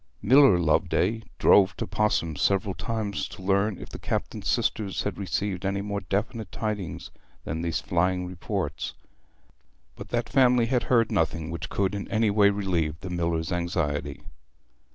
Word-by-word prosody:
Miller 130 -2 +7
Loveday 90 +6 +1 0.2
drove 100 0 +5
to - - -2
Pos'ham 85 -7 0
several 95 +2 +1
times 105 +2 -3
to 95 - -11
learn 100 +1 +1
if - - -10
the - - -8
Captain's - - -3
sisters 100 -3 0
had 100 -2 -3
received 95 0 -2
any 100 +1 -1
more 100 0 -3
definite 105 +4 -3
tidings 105 -7 -4 0.3
than 80 - -4
these 85 -2 -1
flying 90 +1 0
reports; 90 -1 -4 1.0
but - - -10
that 120 -1 -1
family 125 -3 +4
had 125 +1 0
heard 115 -3 +3
nothing 80 0 0
which 85 - -5
could 100 0 0
in 100 -1 -4
any 110 -1 +1
way 100 -1 +5
relieve 90 -6 -1
the 90 - -6
miller's 85 0 -1
anxiety. 75 -5 -2
95 Hz, 155 wpm, -26 LUFS, 85-105 Hz, 1.0 s, Miller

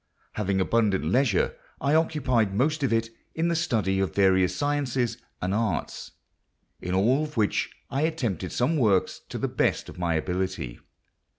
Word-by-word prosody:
Having 100 -2 0
abundant 100 -3 +2
leisure, 105 - +2 0.2
I 140 +3 +1
occupied 135 -10 +2
most 150 +7 +1
of 135 - +1
it 115 0 +1 0.2
in 165 +1 +1
the 170 - +1
study 105 - +1
of 95 -1 -1
various 95 -2 +3
sciences 130 -4 -1 0.2
and 95 +1 0
arts, 110 -4 -2 0.7
in 90 +1 -2
all 120 +9 +3
of 150 -3 -7
which 105 -2 +1 0.2
I 135 - 0
attempted 120 - -1
some 155 +7 +1
works 105 -8 +2
to - - -4
the - - -1
best - - 0
of - - -10
my 85 -2 0
ability. 90 -7 -2
115 Hz, 160 wpm, -26 LUFS, 95-140 Hz, 0.7 s, various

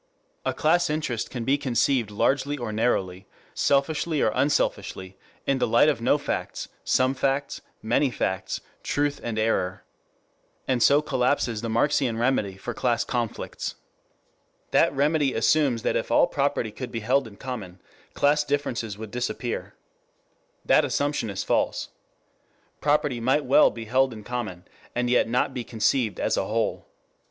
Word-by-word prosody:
A - - +2
class 170 +2 +2
interest 150 -7 -2
can 120 -3 -5
be 140 +3 +2
conceived 125 -2 +1
largely 135 +7 0
or 120 -4 -4
narrowly, 95 -5 -1 0.3
selfishly 150 +3 +1
or 110 - +3
unselfishly, 95 -9 -1 0.3
in 135 -1 +1
the - - +2
light 120 +7 +5
of 145 - -1
no 125 +5 +3
facts, 145 - -4
some 130 +1 +2
facts, 135 +1 -1 0.2
many 120 +5 +2
facts, 95 -5 -2 0.2
truth 145 0 -1
and 115 -2 -3
error. 100 -4 0 0.8
And 130 -2 +1
so 145 +4 +5
collapses 125 -5 0
the 115 - -3
Marxian 125 0 +1
remedy 115 -6 0
for - - -5
class - - +1
conflicts. - - -3 1.0
That - - +4
remedy 145 0 +1
assumes 125 -1 +2
that - - 0
if - - -1
all - - +5
property 140 -5 -1
could 125 +3 -7
be 115 - -4
held 130 +4 +2
in 105 - -13
common, 105 -8 -7 0.4
class 150 +1 +3
differences 125 -7 -2
would 110 -1 -8
disappear. 125 0 -3 0.9
The - - +5
assumption 145 -6 -1
is 100 -1 -3
false. - - 0 0.9
Property 145 -4 +1
might 130 +5 +1
well 135 +4 +6
be 115 -1 -8
held 130 +3 +2
in 110 -1 -10
common, 105 -7 -5 0.3
and 120 0 0
yet 125 - +3
not 125 +2 +1
be 125 -2 -4
conceived 115 0 0
as - - 0
a - - 0
whole. - - -1
125 Hz, 150 wpm, -25 LUFS, 110-140 Hz, 1.0 s, well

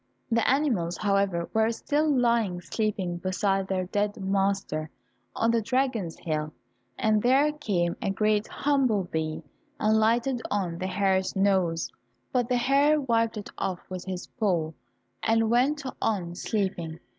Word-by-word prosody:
The 230 0 +2
animals, 235 - +1
however, 195 -4 +1
were 220 0 +3
still 300 +6 0
lying 235 -8 +2
sleeping 190 -2 -2
beside 190 +2 0
their 185 -1 -1
dead 205 +2 -1
master 195 -5 0 0.5
on 230 - +2
the 230 -1 +2
dragon's 235 -7 -1
hill, 155 -2 -3 0.4
and 215 -4 +2
there 270 +5 +4
came 195 - -1
a - - -1
great 210 +2 +1
humble 265 -8 +1
bee 160 -2 -3 0.4
and 220 0 +3
lighted 235 +3 +2
on 180 -5 -1
the 185 - -2
hare's 190 0 +1
nose, 190 -4 +1 0.4
but 245 -1 0
the 250 - +2
hare 280 +5 +3
wiped 230 -4 +1
it 205 - -7
off 185 -2 -3
with 185 -1 -5
his 185 -1 -5
paw, 180 -9 -1 0.5
and 225 0 +2
went 280 +5 +2 0.2
on 185 -6 -1
sleeping. 175 -4 -2
205 Hz, 145 wpm, -27 LUFS, 185-235 Hz, 0.5 s, there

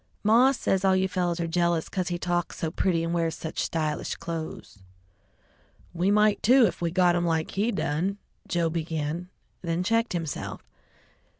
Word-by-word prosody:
"Maw 235 +5 +5
says 195 -7 0
all 190 -1 +4
you 190 0 +2
fellows 180 -2 -1
are 170 - 0
jealous 170 -1 +1
'cause 185 -2 -2
he 175 -1 -1
talks 175 -1 -2
so 160 - -2
pretty 170 -2 +1
and 165 0 -2
wears 165 -1 0
such 160 - -6
stylish 155 -2 -2
clothes." 160 -10 -6 1.1
"We 180 +3 +1
might, 210 0 +3
too, 250 +2 +6
if 180 - -2
we 170 - +1
got 175 0 +3
'em 175 - +1
like 160 -1 0
he 210 +4 0
done," 190 +1 -1 0.3
Joe 170 -2 0
began, 160 +1 -3 0.3
then 170 0 -1
checked 230 +3 +1
himself. 165 -5 -4
175 Hz, 170 wpm, -26 LUFS, 165-190 Hz, 1.1 s, too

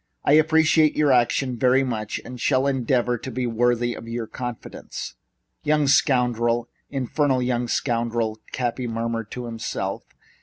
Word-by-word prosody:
I 145 - +4
appreciate 155 0 +4
your 150 -2 +3
action 125 +1 +2
very, 130 +2 +4
very - - +1
much 110 -4 -3
and 125 0 -8
shall 130 -1 +2
endeavor 125 -3 +1
to - - -6
be 130 -1 -2
worthy 120 +1 +1
of 115 - -9
your 115 0 -3
confidence." 120 +1 -7 0.5
"Young 150 0 +2
scoundrel! 120 -4 +2 0.2
In 135 -2 -2
fer 145 +4 0
nal 130 -2 +2
young 125 -1 0
scoundrel!" 115 -3 -1
Cappy 125 0 -2
murmured 115 -1 -3
to 125 -1 -6
himself. 115 -1 -4
125 Hz, 155 wpm, -23 LUFS, 115-135 Hz, 0.5 s, I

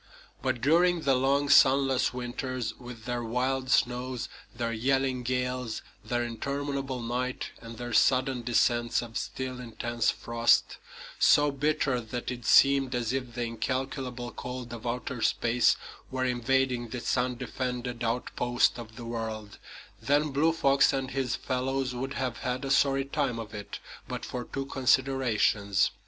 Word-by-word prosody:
But 130 -3 -1
during 170 +4 +4
the 140 -3 +3
long, 135 +2 +2
sunless 135 -1 +5
winters, 125 -1 -4
with 120 -3 -10
their 120 -1 -2
wild 130 +3 -1
snows, 125 0 +1 0.2
their 115 0 -3
yelling 130 +2 +1
gales, 125 -2 -2 0.2
their 120 +2 -1
interminable 135 +2 -3
night, 125 +2 -3
and 115 -1 -9
their 120 0 -5
sudden 130 -1 +3
descents 120 0 +2
of 115 -1 -10
still, 130 -1 -4
intense 120 -1 -1
frost, 115 0 +2 0.4
so 145 0 +5
bitter 140 -2 0
that 120 +2 -5
it 120 -3 -7
seemed 135 -2 +5
as 120 0 -1
if 125 -3 -3
the 120 - -1
incalculable 125 +1 -3
cold 125 -1 -6
of 120 +1 -6
outer 125 +1 -3
space 120 +2 +3 0.3
were 130 0 -1
invading 125 0 +1
this 120 +2 -2
undefended 125 -1 -2
outpost 120 +1 +1
of 110 -2 -9
the 120 - -8
world, 110 -3 -5 0.4
then 145 +1 +2
Blue 150 +4 +3
Fox 140 -4 +3
and 135 -1 -2
his 130 -2 -1
fellows 130 +1 -2
would 135 +3 -4
have 125 -5 -2
had 130 +1 -2
a 135 - -2
sorry 135 -1 +3
time 140 -4 -1
of 110 -1 -7
it 105 -1 -6 0.3
but - - -5
for 125 -1 -5
two 135 0 -4
considerations. 130 -7 +2
125 Hz, 145 wpm, -28 LUFS, 120-135 Hz, 0.4 s, sunless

